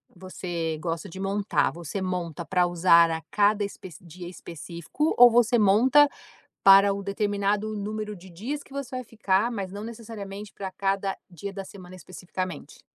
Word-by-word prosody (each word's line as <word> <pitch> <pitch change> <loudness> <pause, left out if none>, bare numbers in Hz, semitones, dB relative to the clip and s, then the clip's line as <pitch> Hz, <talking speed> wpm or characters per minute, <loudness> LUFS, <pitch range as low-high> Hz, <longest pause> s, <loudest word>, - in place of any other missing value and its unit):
você 175 -3 -4
gosta 165 -1 -4
de 190 - -9
montar, 200 +1 0
você 170 +3 -6
monta 175 -3 -3
pra 180 +2 +2
usar 170 -1 +5
a 160 0 -3
cada 205 +2 +2
espec 190 -3 -7
dia 175 +1 -10
específico, 170 - -4
ou 245 0 +10
você 240 0 +3
monta 240 +9 +5 0.6
para 195 +1 +7
o 200 - -5
determinado 205 +1 -1
número 210 +1 -4
de 185 0 -14
dias 235 - -5
que - - -23
você 275 -2 -5
vai 255 - -5
ficar, 215 -1 0
mas 195 -5 -4
não 205 +2 -7
necessariamente 210 -3 -8
pra 190 -1 -6
cada 195 0 -1
dia 190 +3 -7
da 195 -1 -7
semana, 185 -2 -12
especificamente? 185 +1 -7
195 Hz, 160 wpm, -26 LUFS, 180-210 Hz, 0.6 s, ou